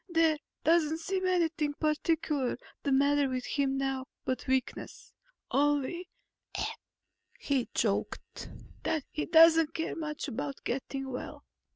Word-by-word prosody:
"There 325 -3 +3 0.2
doesn't 320 -1 +3
seem 375 +3 -1
anything 330 -5 +1
particular 305 -3 0 0.2
the 280 - -1
matter 280 +1 +4
with 255 -1 -2
him 275 -2 0
now 270 -1 -1 0.2
but 255 - -2
weakness. 260 -1 -2 0.4
Only," 290 +5 +1 1.3
he 280 - 0
choked, - - -2 0.3
"that 315 -3 0
he 305 - -3
doesn't 325 -1 +6
care 325 - -2
much 305 -2 -4
about 275 +2 -4
getting 270 +1 -3
well." 250 - -6
295 Hz, 115 wpm, -30 LUFS, 270-325 Hz, 1.3 s, doesn't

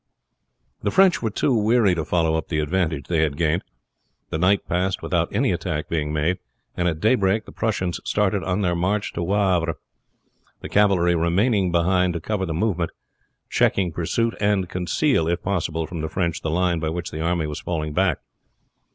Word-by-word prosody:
The - - 0
French 190 -1 +4
were 110 - 0
too 125 +6 0
weary 110 -2 +3
to 85 -2 -1
follow 80 0 +1
up 80 - -2
the 80 - -2
advantage 80 -2 -1
they 85 -2 +1
had 75 -3 0
gained; 85 +2 +1 0.7
the 80 - -2
night 95 +3 +2
passed 90 +2 -1
without - - 0
any - - +1
attack 75 +1 -3
being 75 -2 -1
made, 80 +4 0 0.4
and 90 - 0
at 80 -3 -1
daybreak 105 -1 +2
the - - -11
Prussians 95 -6 -2
started 100 -1 0
on 95 +2 -1
their 90 -3 +1
march 100 +4 -1
to - - -3
Wavre, 90 -3 +1 0.9
the - - -7
cavalry 95 -4 +3
remaining 90 +4 +2
behind 90 +1 +2
to 85 - -3
cover 95 +2 -2
the - - -3
movement, 90 -3 0 0.6
check - - +2 0.2
pursuit, 115 +8 0
and 100 -3 +1
conceal 90 - +1
if 85 +1 -1
possible 80 -4 -1
from 85 -1 -6
the 80 - -3
French 85 -4 -1
the 80 - -2
line 85 +1 +1
by 80 -1 -1
which 85 +1 -4
the 80 - -5
army 85 -1 0
was 75 -1 -5
falling 75 -3 -3
back. 90 -3 +2
90 Hz, 185 wpm, -23 LUFS, 80-100 Hz, 0.9 s, French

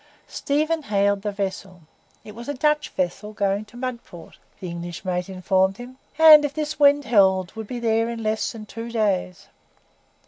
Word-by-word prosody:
Stephen 310 +3 -1
hailed 200 -4 0
the 210 0 -3
vessel. 195 -2 -5 0.4
It 210 - -11
was 235 +5 -9
a 290 - -3
Dutch 300 +3 +1
vessel 190 +4 -3
going 200 0 -1
to 230 +3 -16
Mudport, 235 -9 -8 0.2
the 185 - -6
English 170 +2 -7
mate 180 0 -2
informed 190 +1 +1
him, 250 +1 -11 0.2
and, 310 -2 +9
if 285 -1 -3
this 310 0 -4
wind 285 0 +5
held, 190 -5 +2
would 220 -1 -7
be 245 - -5
there 225 0 +1
in 230 -1 -5
less 215 0 -1
than 220 -2 -9
two 230 +2 -8
days. 195 -5 -1
215 Hz, 175 wpm, -23 LUFS, 190-255 Hz, 0.4 s, and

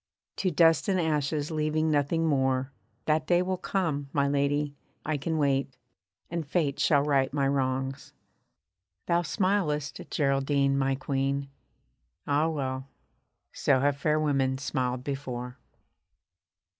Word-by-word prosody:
To 190 - +1
dust 165 -2 +4
and 190 -1 +2
ashes, 150 -2 0
leaving 155 0 0
nothing 150 +3 +1
more, 135 -2 +1 0.3
That 155 0 +1
day 175 0 +3
will 185 0 -2
come, 155 -8 -1
my 140 -1 +1
lady, 140 +1 0 0.3
I 155 - 0
can 160 +3 -2
wait; 135 -3 0 0.5
and 170 -1 -2
Fate 145 -2 -1
Shall 145 -2 +4
right 135 -2 +2
my 140 -1 +1
wrongs. 135 -1 -1 0.9
Thou 170 0 +2
smilest, 155 -3 0
Geraldine, 140 -1 +1
my 135 0 +1
Queen! 140 0 -2 0.7
Ah 145 +3 +2
well, 135 -3 -3 0.7
so 135 -2 +2
have 145 0 +2
fair 150 +2 +1
women 135 -3 +1
smiled 130 -2 -2
before. 130 -2 -5
145 Hz, 125 wpm, -28 LUFS, 135-155 Hz, 0.9 s, dust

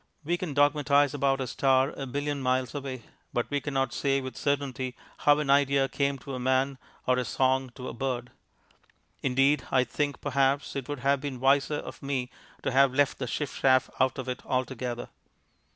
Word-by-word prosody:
We 170 +4 0
can 175 -5 -4
dogmatize 145 -1 +3
about 135 -1 +1
a - - -1
star 130 +2 +2
a 135 - -5
billion 145 +2 -2
miles 130 -1 0
away, 135 -4 -5 0.3
but 120 - 0
we 145 0 0
cannot 135 -3 -1
say 140 -1 +1
with 130 -3 -6
certainty 130 0 -2 0.3
how 145 0 +7
an 150 -2 +1
idea 140 -1 +4
came 140 0 0
to 135 +2 -8
a 130 - -3
man 130 +1 +1 0.3
or 125 0 +3
a - - 0
song 130 +2 +1
to 130 - -7
a - - -5
bird. 125 0 -3 0.9
Indeed, 135 +3 +2
I 130 -1 +4
think, 145 +2 -2
perhaps, 140 0 +1
it 135 -1 -4
would 145 -3 -4
have 140 0 +2
been 140 -3 -5
wiser 140 +3 +3
of - - -7
me 135 -3 -2 0.3
to - - 0
have 135 0 +4
left 145 0 +2
the 125 - -3
chiff 145 +4 -3
chaff 130 -1 +4
out 130 +1 +2
of 130 -1 -5
it 125 -1 -4
altogether. 125 -2 -3
135 Hz, 190 wpm, -28 LUFS, 130-140 Hz, 0.9 s, how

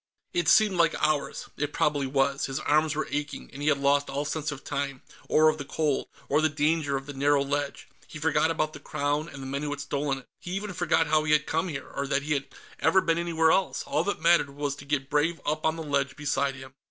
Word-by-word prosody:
It 175 -3 +1
seemed 210 -4 +5
like 165 -2 +3
hours. 155 -2 0
It 145 0 -2
probably 145 -2 +1
was; 135 +1 +1
his 135 0 -3
arms 155 0 +2
were 155 - -2
aching, 150 0 -4
and 140 - -8
he 145 - -1
had 150 -2 +4
lost 140 +1 +2
all 140 +2 -2
sense 150 0 -2
of 145 -1 -8
time, 140 -2 -3 0.3
or 155 0 +5
of 155 0 +2
the - - -3
cold, 145 0 -1 0.2
or 150 +3 +2
the 155 - +3
danger 150 -1 +1
of 135 - -7
the 145 - -7
narrow 140 +1 +2
ledge; 140 0 -3 0.2
he - - -9
forgot 160 +1 +2
about 155 -1 -1
the - - -9
Crown 145 +2 -2
and 135 -3 -9
the - - -6
men 140 +1 -3
who 150 - -2
had 145 -1 -4
stolen 140 -1 -1
it; 130 - -12
he 175 - -6
even 200 0 -4
forgot 165 - +2
how 155 0 +2
he 150 0 +2
had 150 0 +3
come 165 +3 0
here, 145 -6 -5
or 140 - -4
that 140 +1 0
he 150 +1 0
had 140 -1 -2 0.3
ever 165 +4 +4
been 165 -2 +1
anywhere 165 -2 +2
else. 190 +2 +1
All 155 - 0
that 200 - -1
mattered 165 -2 +4
was 140 0 -3
to 145 - -11
get 140 -2 -1
Brave 150 +4 +1
up 155 +1 0
on 160 - +1
the 165 - -5
ledge 140 -3 0
beside 140 -2 0
him. 130 0 -11
145 Hz, 250 wpm, -27 LUFS, 140-155 Hz, 0.3 s, seemed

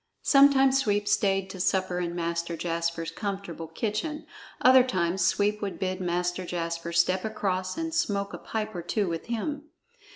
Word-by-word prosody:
Sometimes 270 -1 +5
Sweep 205 -4 0
stayed 195 -2 +2
to 190 - -9
supper 185 0 0
in 175 -1 -3
Master 170 0 -2
Jasper's 170 -1 -2
comfortable 195 -5 -5
kitchen; 220 - -3 0.3
other 260 0 +7
times 185 -6 0
Sweep 205 +4 +1
would 200 -2 -3
bid 185 0 -2
Master 175 +1 -1
Jasper 170 -1 -3
step 185 +2 +2
across 195 -2 -2
and 325 0 -3
smoke 200 - -1
a - - -6
pipe 215 -1 -4
or 175 - -4
two 200 +4 -1
with 165 -1 -4
him. 285 +6 -3
190 Hz, 160 wpm, -27 LUFS, 170-215 Hz, 0.3 s, other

